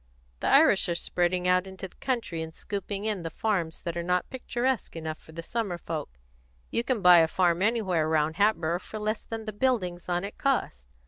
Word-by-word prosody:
The - - -2
Irish - - +5
are 170 - 0
spreading 180 +1 0
out 180 +1 +3
into 190 0 -7
the - - -25
country 235 -11 -2
and 160 0 -7
scooping 200 0 -4
in 210 -4 -1
the 165 - -4
farms 175 -3 -2
that 170 -1 -3
are 170 - -1
not 180 +1 0
picturesque 255 -3 -2
enough 160 -1 -5
for - - -16
the 165 +1 -7
summer 205 -3 -2
folks. 155 - -5 0.5
You 230 - +1
can 240 -4 -1
buy 180 -1 +9
a 160 - +5
farm 175 0 +2
anywhere 190 -8 +1
round 155 0 +1
Hatboro' 175 -5 +2
for 215 - -8
less 215 +1 -2
than 225 -1 -6
the 215 - -4
buildings 190 -8 -1
on 175 +1 0
it 200 - -7
cost. 155 - 0
180 Hz, 205 wpm, -28 LUFS, 170-215 Hz, 0.5 s, buy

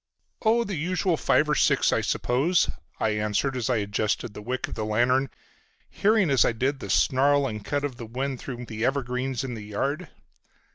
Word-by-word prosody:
"Oh, 230 +1 +3
the 205 - -5
usual 180 +3 0
five 155 0 +2
or 150 - +2
six - - +3
I - - +2
suppose," 150 +9 +1 0.3
I 110 - +1
answered 105 +5 0
as 125 -2 -2
I 125 - +2
adjusted 105 +1 -1
the 105 - -8
wick 125 +4 -3
of - - -7
my 110 - -3
lantern, 120 +5 +2 0.6
hearing 205 -6 +2
as 135 - +5
I - - +1
did 130 +4 -1
the 100 - -7
snarl 140 +7 +3
and 105 -5 -4
cut 145 +6 -2
of 135 -4 -3
the 115 - -7
wind 130 +3 -3
through 125 -2 -6
the 110 -1 -5
evergreens 130 -1 -1
in 130 -2 -4
the 110 - -6
yard. 140 - -2
130 Hz, 195 wpm, -26 LUFS, 115-145 Hz, 0.6 s, as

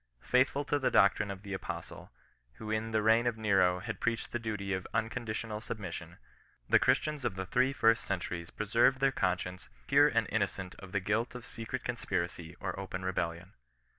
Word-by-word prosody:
Faithful 135 +3 +2
to 145 0 +1
the 135 - +2
doctrine 100 0 +4
of 100 0 -6
the 100 -1 -5
apostle, 95 - -6 0.4
who 110 - -7
in 110 +1 -1
the 110 -1 +1
reign 115 +2 +4
of 120 -2 0
Nero 95 -4 +3
had - - -5
preached 115 -1 -1
the 120 - -2
duty 105 -4 -3
of 95 -1 -3
unconditional 110 -1 -2
submission, 90 -7 -6 0.5
the - - +6
Christians 150 -3 +1
of 105 - -1
the 95 0 -3
three 125 +8 +2
first 115 -4 +3
centuries 90 -2 -3
preserved 115 +5 +2
their 135 0 +3
conscience 90 -4 -2 0.2
pure - - +6
and - - +1
inno - - +1
cent 95 -1 -7
of 95 -1 -10
the 100 - +1
guilt 110 +6 0
of 125 - -7
secret 115 +3 -5
conspiracy 85 -8 -3
or 95 0 -4
open 95 -1 -5
rebellion. 90 -1 -2
105 Hz, 185 wpm, -32 LUFS, 95-115 Hz, 0.5 s, the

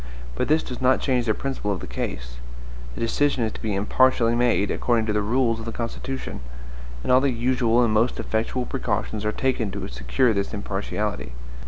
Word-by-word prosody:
But - - -1
this 155 +1 +3
does 125 - -6
not 130 0 +4
change 125 -3 +1
the 110 - +2
principle 135 -7 -2
of 95 - -2
the - - -6
case. - - -5 0.6
The - - -6
decision 130 +2 +1
is 110 - 0
to - - -9
be 105 -2 -1
impartially 115 +3 +3
made, 120 -4 +2
according 115 -2 +1
to 105 - 0
the 105 - +2
rules 115 +1 +1
of 110 - -7
the 115 - -3
Constitution; 120 +3 -4 0.6
and - - 0
all 130 +1 +6
the 140 - +3
usual 120 -1 +2
and 115 -2 +2
most 115 +3 +2
effectual 115 +3 -1
precautions 105 -3 -2
are 105 - +2
taken 120 -2 0
to - - -5
secure 110 - +1
this 100 +2 -2
impartiality. 100 - -3
115 Hz, 195 wpm, -24 LUFS, 105-125 Hz, 0.6 s, all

